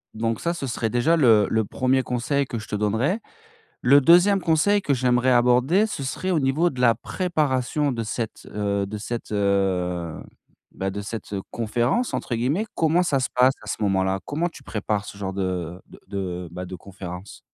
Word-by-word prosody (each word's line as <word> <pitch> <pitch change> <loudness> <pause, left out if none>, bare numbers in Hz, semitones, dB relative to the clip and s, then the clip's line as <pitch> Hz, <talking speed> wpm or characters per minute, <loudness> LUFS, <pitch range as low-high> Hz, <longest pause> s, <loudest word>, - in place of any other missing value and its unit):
donc 115 0 -1
ça 170 - 0
ce 140 - -4
serait 115 -2 -2
déjà 120 +9 +2
le 115 - +5
le 110 0 +2
1er 130 +5 +1
conseil 130 +4 0
que 120 -3 -5
je 110 - -10
te - - -3
donnerai. 110 - 0 0.6
Le 140 +3 +6
2e 180 +7 +5
conseil 175 +5 +3
que 145 -7 +1
j'aimerais 125 0 +2
aborder 125 - +4
ce 210 -10 -5
serait 160 +8 -3
au 175 - +2
niveau 145 +6 +2
de 130 - -7
la 120 -2 +5
préparation 150 -5 -1
de 115 -2 -3
cette, 110 +1 -5
heu 100 -1 -1
de 105 +2 -6
cette, 115 +2 -5
heu 95 -4 0 0.5
bah, 95 0 -3
de 100 +1 -5
cette, 110 +1 -7
heu, 100 -1 -2
conférence 120 - 0
entre 120 - -2
guillemets. 140 - 0
Comment 165 +2 +3
ça 145 -6 +1
se 125 - +1
passe 125 +1 +5
à - - -13
ce - - -4
moment-là? 95 -1 +1
Comment 165 +4 -1
tu 165 - -14
prépares 105 -4 -2
ce 100 - -10
genre 95 -1 -3
de 90 -2 -3
de - - -15
de 90 -3 -4
bah, 90 +1 -6
de 95 0 -7
conférence? 90 0 -9
120 Hz, 195 wpm, -24 LUFS, 100-140 Hz, 0.6 s, Le